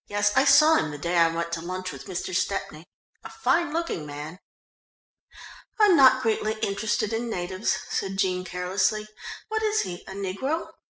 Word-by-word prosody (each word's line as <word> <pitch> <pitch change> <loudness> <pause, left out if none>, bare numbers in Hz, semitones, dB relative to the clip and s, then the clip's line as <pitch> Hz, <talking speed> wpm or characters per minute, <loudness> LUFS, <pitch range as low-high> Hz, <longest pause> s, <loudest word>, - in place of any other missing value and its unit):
"Yes, 205 0 +1
I 270 - +4
saw 305 +3 +6
him 155 - 0
the 150 - -6
day 170 +4 -2
I 165 - +6
went 170 +1 -3
to 165 -1 -3
lunch 185 +2 -5
with - - -10
Mr. 185 -1 -4
Stepney, 175 -4 -2 0.4
a - - -8
fine 340 -4 0
looking 330 - -2
man." 150 +5 -8 1.4
"I'm 415 -4 +6
not 260 -3 +6
greatly 220 -1 0
interested 210 +2 -1
in 235 +1 -2
natives," 185 0 -2
said 195 0 -2
Jean 185 -2 0
carelessly. 190 +4 -1 0.4
"What 440 0 -1
is 430 0 +1
he, 175 -1 -6
a - - -7
negro?" 200 - -3
195 Hz, 170 wpm, -25 LUFS, 175-240 Hz, 1.4 s, saw